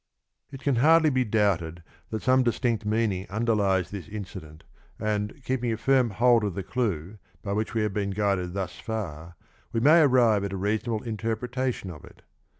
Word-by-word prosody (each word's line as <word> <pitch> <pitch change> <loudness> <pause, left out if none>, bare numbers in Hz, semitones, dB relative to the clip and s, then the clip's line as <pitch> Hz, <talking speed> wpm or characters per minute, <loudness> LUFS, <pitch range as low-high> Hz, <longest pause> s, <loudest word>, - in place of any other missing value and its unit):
It 135 -1 -9
can 140 -3 +1
hardly 160 +4 +5
be 130 -1 +2
doubted 95 -7 0 0.3
that 110 - -4
some 130 0 +4
distinct 115 -2 0
mean 110 0 +1
ing 95 +1 -5
underlies 100 -4 +1
this 100 -3 -7
incident, 90 -7 -9 0.3
and, 105 -1 -2
keeping 125 -2 -1
a 110 - -2
firm 130 0 +3
hold 115 +2 +3
of 100 -4 -2
the 100 - -3
clue 100 -4 -3 0.2
by 100 - -2
which 110 +3 -2
we 110 - +1
have 105 -2 -1
been 100 -1 -1
guided 100 -3 -1
thus 95 -2 -4
far 85 -7 -5 0.4
we 115 - 0
may 155 +7 +6
arrive 120 -8 +4
at 100 -1 -3
a - - -3
reasonable 110 +3 -1
interpretation 115 0 -3
of 75 - -11
it. - - -16
110 Hz, 180 wpm, -26 LUFS, 100-120 Hz, 0.4 s, may